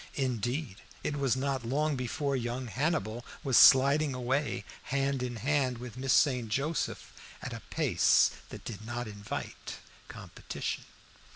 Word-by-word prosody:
Indeed, 125 Hz, -2 st, -2 dB, 0.3 s
it 145 Hz, -, -1 dB
was 135 Hz, -4 st, +2 dB
not 135 Hz, -1 st, -1 dB
long 145 Hz, +5 st, 0 dB
before 140 Hz, +3 st, -2 dB
young 125 Hz, +1 st, -2 dB
Hannibal 125 Hz, -3 st, -1 dB, 0.2 s
was 135 Hz, -4 st, +1 dB
sliding 140 Hz, +2 st, +7 dB
away 130 Hz, +4 st, -1 dB, 0.2 s
hand 135 Hz, 0 st, 0 dB
in 125 Hz, -1 st, -3 dB
hand 130 Hz, +1 st, 0 dB
with 120 Hz, -1 st, -8 dB
Miss 130 Hz, +1 st, -1 dB
St. 125 Hz, -5 st, +3 dB
Joseph 140 Hz, +8 st, -2 dB, 0.3 s
at -, -, -6 dB
a -, -, -7 dB
pace -, -, +4 dB, 0.2 s
that -, -, -10 dB
did 110 Hz, -2 st, -6 dB
not 120 Hz, +2 st, -4 dB
invite 105 Hz, -1 st, -6 dB, 0.3 s
competition. -, -, -6 dB
130 Hz, 135 wpm, -30 LUFS, 120-140 Hz, 0.3 s, sliding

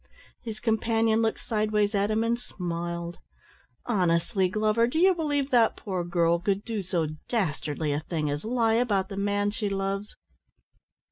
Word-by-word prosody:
His 220 Hz, -2 st, -6 dB
companion 225 Hz, 0 st, +2 dB
looked 225 Hz, -1 st, 0 dB
sideways 210 Hz, -1 st, +1 dB
at 200 Hz, 0 st, +1 dB
him 220 Hz, +1 st, +1 dB
and 235 Hz, +1 st, 0 dB
smiled. 170 Hz, -4 st, -5 dB, 0.7 s
"Honestly, 185 Hz, -2 st, +1 dB
Glover, 215 Hz, +3 st, +2 dB
do 250 Hz, -, -3 dB
you 375 Hz, +3 st, +6 dB
believe 290 Hz, -5 st, -1 dB
that 235 Hz, -3 st, +4 dB
poor 185 Hz, -4 st, -3 dB
girl 170 Hz, -1 st, +2 dB
could 195 Hz, +3 st, 0 dB
do 225 Hz, -3 st, -2 dB
so 175 Hz, -3 st, -1 dB, 0.2 s
dastardly 155 Hz, -, -1 dB
a 145 Hz, -, 0 dB
thing 155 Hz, -1 st, -3 dB
as 145 Hz, +1 st, -2 dB
lie 230 Hz, -1 st, +1 dB
about 210 Hz, -5 st, +1 dB
the 195 Hz, -, -6 dB
man 205 Hz, 0 st, +1 dB
she 210 Hz, -1 st, -2 dB
loves?" 195 Hz, +1 st, -3 dB
205 Hz, 155 wpm, -27 LUFS, 175-225 Hz, 0.7 s, you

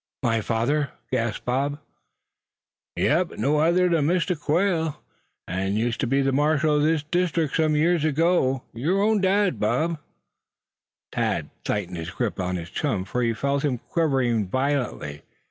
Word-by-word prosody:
"My 115 Hz, -2 st, +2 dB
father?" 125 Hz, +7 st, 0 dB, 0.2 s
gasped 115 Hz, -4 st, -1 dB
Bob. 140 Hz, +4 st, 0 dB, 1.2 s
"Yep, 170 Hz, +3 st, +1 dB
an' -, -, -7 dB
no 150 Hz, +2 st, +2 dB
other 170 Hz, +3 st, +3 dB
then 165 Hz, -4 st, +2 dB
Mistah 180 Hz, +1 st, +1 dB
Quail, 160 Hz, +1 st, 0 dB, 0.5 s
as 95 Hz, +2 st, -1 dB
used 115 Hz, +2 st, -1 dB
ter 130 Hz, -, 0 dB
be 135 Hz, +3 st, +2 dB
ther 135 Hz, -, +2 dB
marshal 150 Hz, +2 st, +2 dB
o' 150 Hz, -, +3 dB
this 155 Hz, 0 st, +2 dB
deestrict 165 Hz, -1 st, 0 dB
sum 155 Hz, -1 st, +2 dB
years 165 Hz, +1 st, +2 dB
ago, 155 Hz, -4 st, +2 dB
yer 155 Hz, +12 st, 0 dB
own 210 Hz, 0 st, +2 dB
dad, 195 Hz, 0 st, +2 dB
Bob!" 165 Hz, 0 st, 0 dB, 1.1 s
Thad -, -, -1 dB
tightened 90 Hz, -4 st, -2 dB
his 80 Hz, +1 st, -5 dB
grip 105 Hz, +2 st, -3 dB
upon 90 Hz, 0 st, -1 dB
his 85 Hz, -1 st, -6 dB
chum, 105 Hz, -11 st, -1 dB
for 125 Hz, -, -2 dB
he 115 Hz, -1 st, +1 dB
felt 140 Hz, +3 st, -1 dB
him 135 Hz, -4 st, 0 dB
quivering 125 Hz, -, 0 dB
violently. 130 Hz, -, -2 dB
145 Hz, 155 wpm, -24 LUFS, 120-165 Hz, 1.2 s, other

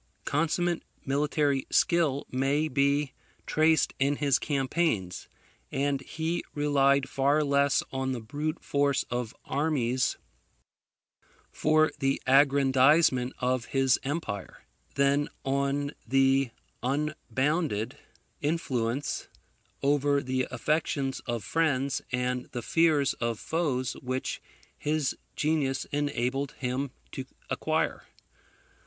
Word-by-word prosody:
Consummate 165 Hz, +3 st, 0 dB, 0.2 s
military 145 Hz, 0 st, +1 dB
skill 160 Hz, -5 st, +2 dB
may 140 Hz, +4 st, +1 dB
be 140 Hz, 0 st, +1 dB, 0.3 s
traced 160 Hz, 0 st, +3 dB
in 140 Hz, +2 st, +2 dB
his 140 Hz, -2 st, +2 dB
campaigns; 135 Hz, -, -1 dB, 0.4 s
and 140 Hz, 0 st, 0 dB
he 160 Hz, +4 st, -3 dB
relied 140 Hz, -2 st, +3 dB
far 140 Hz, +3 st, +2 dB
less 140 Hz, -1 st, +3 dB
on 130 Hz, 0 st, -1 dB
the 125 Hz, -, -2 dB
brute 150 Hz, +8 st, -4 dB
force 140 Hz, -1 st, +1 dB
of 125 Hz, 0 st, -3 dB
armies 130 Hz, -4 st, 0 dB, 1.3 s
for 155 Hz, 0 st, +3 dB
the 135 Hz, -1 st, +1 dB
aggrandizement 135 Hz, 0 st, +4 dB
of 125 Hz, -2 st, 0 dB
his 135 Hz, -2 st, +2 dB
empire, 135 Hz, -, -4 dB, 0.3 s
than 140 Hz, +1 st, +2 dB, 0.2 s
on 140 Hz, +1 st, 0 dB, 0.2 s
the 135 Hz, +1 st, +3 dB, 0.3 s
unbounded 145 Hz, -2 st, -1 dB, 0.4 s
influence 140 Hz, -4 st, -1 dB, 0.6 s
over 140 Hz, 0 st, +2 dB
the 130 Hz, 0 st, -1 dB
affections 135 Hz, 0 st, -1 dB
of 120 Hz, -3 st, -2 dB
friends 140 Hz, -1 st, 0 dB
and 125 Hz, 0 st, -1 dB
the 120 Hz, -2 st, -4 dB
fears 155 Hz, -3 st, +3 dB
of 115 Hz, -1 st, -2 dB
foes 135 Hz, -7 st, -1 dB
which 130 Hz, 0 st, -3 dB, 0.3 s
his 150 Hz, -2 st, -1 dB, 0.2 s
genius 145 Hz, -4 st, 0 dB
enabled 140 Hz, -1 st, -1 dB
him 130 Hz, +2 st, -2 dB, 0.2 s
to 130 Hz, -, -5 dB, 0.3 s
acquire. -, -, -1 dB
140 Hz, 100 wpm, -28 LUFS, 130-150 Hz, 1.3 s, aggrandizement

